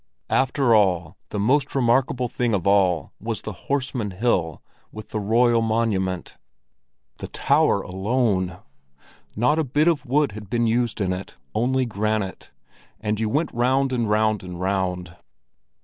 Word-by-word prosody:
After 135 -2 +2
all, 90 -5 +2
the 105 - -4
most 135 +8 +1
remarkable 125 0 +2
thing 120 -2 0
of 90 - -3
all 95 -6 +2
was - - -4
the - - -5 0.2
Horseman 130 -6 -1
Hill 90 -6 0 0.3
with 110 - -10
the 110 - -3
royal 115 +3 +3
monument. 110 -5 -1 0.8
The - - -5
tower - - +2
alone! 95 -2 0 0.8
Not 135 +9 +2
a - - +2
bit 150 +4 +1
of 160 -6 +1
wood 145 0 +2
had 105 -1 -10
been 120 +1 +1
used 115 -1 0
in 95 -1 +1
it, 90 +1 -7 0.2
only 130 +3 +1
granite; 105 -3 -2 0.5
and 105 -1 -2
you 110 -1 0
went 150 +8 0
round 130 +3 +1
and 120 -3 0
round 110 0 +2
and 90 -1 -8
round. 90 -2 -2
110 Hz, 150 wpm, -23 LUFS, 95-125 Hz, 0.8 s, royal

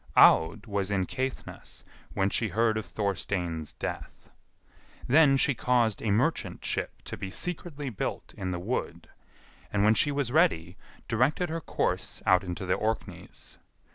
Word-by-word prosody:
Aud 85 +6 +6
was 100 -2 -2
in 95 -2 +1
Caithness 130 +3 -5 0.3
when 95 - +2
she 115 - +1
heard 110 +1 +1
of 110 -4 -3
Thorstein's 90 -5 -2
death. - - -7 0.7
Then 140 0 +5
she 135 - +3
caused 120 -3 +1
a 110 - -1
merchant 125 +11 0
ship - - -3
to - - -6
be 95 - -6
secretly 150 - -3
built 105 - -4
in 95 - -4
the 90 - -2
wood, 105 +9 -4 0.6
and 100 -1 +1
when 105 +1 +6
she 110 +7 +2
was 140 -4 -1
ready, 110 - +2 0.3
directed 140 +9 +1
her 165 +1 -3
course - - -2
out 95 +1 +5
into 90 +1 -5
the 90 - +1
Orkneys. 110 +1 -4
110 Hz, 150 wpm, -28 LUFS, 95-135 Hz, 0.7 s, Aud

